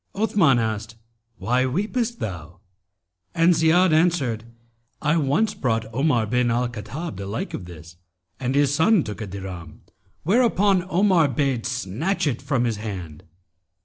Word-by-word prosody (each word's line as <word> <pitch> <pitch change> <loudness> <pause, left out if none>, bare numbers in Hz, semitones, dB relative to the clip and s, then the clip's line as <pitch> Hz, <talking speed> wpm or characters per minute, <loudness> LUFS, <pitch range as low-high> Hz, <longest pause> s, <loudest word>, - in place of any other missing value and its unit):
Othman 195 - +3
asked 110 -1 -3 0.4
'Why 125 +2 +1
weepest 225 - -2
thou?'; 90 -2 -6 0.8
and 165 +2 +5
Ziyad 165 +2 +4
answered, 155 -9 +1 0.5
'I 150 +2 +1
once 165 +9 +1
brought 115 -3 -1
Omar 125 -3 +2
bin 125 +2 +1
al 120 +1 +1
Khattab 120 - -6
the 100 0 -6
like 105 +3 -4
of 90 - -5
this 85 0 -12 0.4
and 130 +1 -2
his 145 -1 +3
son 165 +4 +4
took 105 +1 -7
a 110 - -4
dirham, 95 -4 -8 0.4
whereupon 200 -2 +2
Omar 180 -4 +3
bade 135 -3 -1
snatch 125 - -2
it 130 -5 -1
from 135 -3 0
his 115 -3 -1
hand. 90 -8 -7
130 Hz, 145 wpm, -23 LUFS, 110-170 Hz, 0.8 s, and